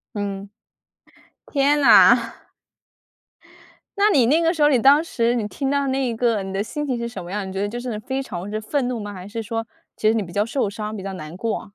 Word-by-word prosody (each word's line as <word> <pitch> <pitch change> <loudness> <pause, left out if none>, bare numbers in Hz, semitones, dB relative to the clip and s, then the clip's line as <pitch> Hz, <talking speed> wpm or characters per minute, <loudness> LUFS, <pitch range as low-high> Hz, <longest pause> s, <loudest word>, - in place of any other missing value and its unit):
嗯。 200 -1 -4 1.0
天 290 +1 +2
呐。 280 - +6 1.6
那 405 +1 +4
你 255 -9 +4
那 310 +6 +3
个 330 +1 +2
时 305 - -1
候， 295 - +6
你 265 -4 +3
当 280 +6 +5
时 235 -7 0
你 220 -4 -1
听 270 +5 -3
到 280 0 +1
那 265 -1 0
一 235 - -2
个 225 -3 +1
你 190 0 -6
的 195 +1 -1
心 295 +7 -4
情 255 -3 -1
是 235 - -3
什 235 - -7
么 175 - -9
样， 200 0 -3
你 190 - -7
觉 195 - -3
得 205 - -1
就 240 +3 -5
是 240 -4 -4
非 265 +5 -3
常 190 -6 -6
之 215 +1 -3
愤 255 +4 -1
怒 245 -2 -3
吗？ 205 -1 -6
还 185 -1 -9
是 225 +1 -5
说 225 +1 -4 0.3
其 215 - +1
实 220 - +3
你 225 - 0
比 175 -3 -9
较 205 +2 +1
受 230 -2 -1
伤、 215 +1 -5
比 190 - -7
较 195 0 -5
难 155 -1 -8
过？ 220 +1 -3
225 Hz, 260 characters per minute, -22 LUFS, 205-270 Hz, 1.6 s, 呐